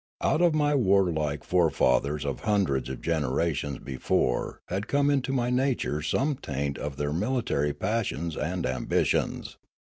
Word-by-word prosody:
Out 160 Hz, -, +2 dB
of 170 Hz, -3 st, +4 dB
my 150 Hz, -1 st, +2 dB
warlike 90 Hz, -, +2 dB
forefathers 75 Hz, -4 st, +2 dB
of 70 Hz, -3 st, -2 dB
hundreds 95 Hz, -12 st, 0 dB
of 65 Hz, -, -6 dB
generations 75 Hz, -2 st, 0 dB
be 65 Hz, -1 st, -7 dB
fore 60 Hz, -1 st, 0 dB
had 100 Hz, +4 st, -3 dB
come 145 Hz, 0 st, +2 dB
into 135 Hz, -2 st, 0 dB
my 125 Hz, -2 st, 0 dB
nature 125 Hz, -, 0 dB
some 135 Hz, -, 0 dB
taint 70 Hz, -, -3 dB
of 75 Hz, -2 st, -5 dB
their 75 Hz, 0 st, -1 dB
mili 110 Hz, -, -1 dB
tary 75 Hz, +1 st, 0 dB
passions 85 Hz, -2 st, -2 dB
and 85 Hz, +4 st, -2 dB
ambitions. 65 Hz, 0 st, -1 dB
85 Hz, 150 wpm, -27 LUFS, 70-120 Hz, -, of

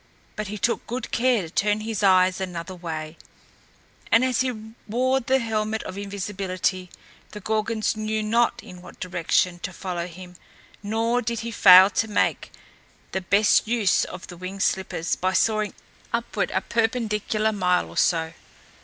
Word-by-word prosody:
But 215 Hz, -1 st, -4 dB
he 210 Hz, +2 st, -5 dB
took 235 Hz, +3 st, -1 dB
good 245 Hz, 0 st, -5 dB
care 240 Hz, -3 st, +2 dB
to 165 Hz, -, -8 dB
turn 210 Hz, +3 st, +1 dB
his 220 Hz, -2 st, -3 dB
eyes 185 Hz, -1 st, +4 dB
another 180 Hz, -1 st, -5 dB
way; 160 Hz, -3 st, -6 dB, 0.9 s
and 230 Hz, +3 st, +5 dB
as 255 Hz, -1 st, +1 dB
he 220 Hz, -4 st, -4 dB
wore 255 Hz, +4 st, +1 dB
the 260 Hz, +1 st, +1 dB
helmet 220 Hz, -2 st, -2 dB
of 185 Hz, -, -7 dB
invisibility, 195 Hz, -2 st, -3 dB, 0.4 s
the 210 Hz, -, -7 dB
Gorgons 220 Hz, +1 st, -1 dB
knew 215 Hz, 0 st, -2 dB
not 230 Hz, +2 st, +1 dB
in 180 Hz, -1 st, -12 dB
what -, -, -14 dB
direction 180 Hz, 0 st, 0 dB
to 185 Hz, -, -5 dB
follow 180 Hz, -1 st, -4 dB
him; 180 Hz, 0 st, -12 dB, 0.4 s
nor 225 Hz, +4 st, 0 dB
did 235 Hz, -1 st, -3 dB
he 235 Hz, +1 st, -5 dB
fail 185 Hz, -2 st, +8 dB
to 225 Hz, -, 0 dB
make 210 Hz, -, 0 dB, 0.6 s
the 190 Hz, -, -2 dB
best 205 Hz, +4 st, +3 dB
use 220 Hz, -5 st, +2 dB
of 180 Hz, -, -7 dB
the 175 Hz, -, -11 dB
winged 185 Hz, +2 st, -4 dB
slippers 185 Hz, -3 st, -1 dB
by 185 Hz, +1 st, -1 dB
soaring 215 Hz, 0 st, +1 dB, 0.4 s
upward -, -, -1 dB
a -, -, -1 dB
perpendicular 220 Hz, -2 st, 0 dB
mile 180 Hz, -3 st, +1 dB
or -, -, -12 dB
so. 160 Hz, -2 st, +1 dB
205 Hz, 160 wpm, -24 LUFS, 185-225 Hz, 0.9 s, fail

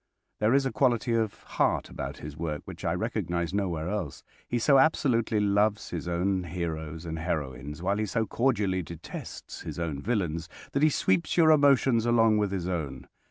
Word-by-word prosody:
There 110 Hz, +4 st, +3 dB
is 140 Hz, -1 st, +3 dB
a 135 Hz, -, 0 dB
quality 120 Hz, -1 st, +2 dB
of 110 Hz, -3 st, -1 dB
heart -, -, 0 dB
about -, -, -6 dB
his 75 Hz, 0 st, -8 dB
work 75 Hz, -2 st, -4 dB
which -, -, -9 dB
I -, -, +1 dB
recognize 85 Hz, +1 st, -2 dB
nowhere 90 Hz, -5 st, -1 dB
else. 90 Hz, -7 st, -4 dB, 0.2 s
He 120 Hz, -, -1 dB
so 135 Hz, +3 st, +5 dB
absolutely 125 Hz, -7 st, +2 dB
loves 105 Hz, +1 st, +1 dB
his 85 Hz, 0 st, -4 dB
own 90 Hz, +2 st, 0 dB
heroes 80 Hz, -1 st, -4 dB
and 80 Hz, -1 st, -4 dB
heroines, 75 Hz, -2 st, -4 dB
while 100 Hz, +2 st, +1 dB
he 110 Hz, 0 st, -1 dB
so 110 Hz, +3 st, 0 dB
cordially 105 Hz, -7 st, +1 dB
detests 85 Hz, -1 st, -8 dB
his -, -, -6 dB
own 80 Hz, -5 st, -3 dB
villains, 85 Hz, -6 st, -1 dB, 0.2 s
that 140 Hz, -, 0 dB
he 155 Hz, -, +6 dB
sweeps 95 Hz, -, +1 dB
your 160 Hz, -2 st, +7 dB
emotions 135 Hz, -5 st, +4 dB
along 115 Hz, -2 st, +4 dB
with 105 Hz, -2 st, 0 dB
his 90 Hz, -3 st, -2 dB
own. 75 Hz, -8 st, -4 dB
95 Hz, 180 wpm, -28 LUFS, 85-115 Hz, 0.2 s, your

